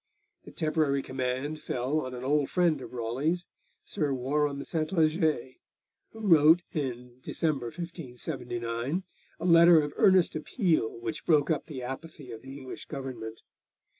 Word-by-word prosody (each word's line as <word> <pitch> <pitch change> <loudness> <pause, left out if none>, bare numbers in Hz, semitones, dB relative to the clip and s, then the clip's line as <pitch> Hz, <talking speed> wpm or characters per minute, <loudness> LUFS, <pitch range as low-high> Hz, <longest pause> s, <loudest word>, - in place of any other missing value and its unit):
The - - -10
temporary 155 -3 0
command 130 +4 -3
fell 130 +5 -1
on 130 - -6
an 125 - -7
old 145 +1 +1
friend 170 -6 +2
of - - -9
Raleigh's, 130 +9 -1 0.4
Sir 150 -2 -1
Warham 140 +2 0
Sentleger, 155 -4 +1 0.6
who 225 - -13
wrote 165 -3 +6
in 125 -4 -4
December 145 -4 -1
1579 125 -2 -4 0.4
a - - -4
letter 170 -1 +8
of 145 -1 -2
earnest 185 -4 +5
appeal 155 - 0
which 115 -1 -5
broke 155 -1 +4
up 155 - -1
the 135 -5 -6
apathy 135 +1 -7
of 115 - -8
the 135 +1 -9
English 130 -2 -8
Government. 125 -6 -6
145 Hz, 135 wpm, -29 LUFS, 125-160 Hz, 0.6 s, letter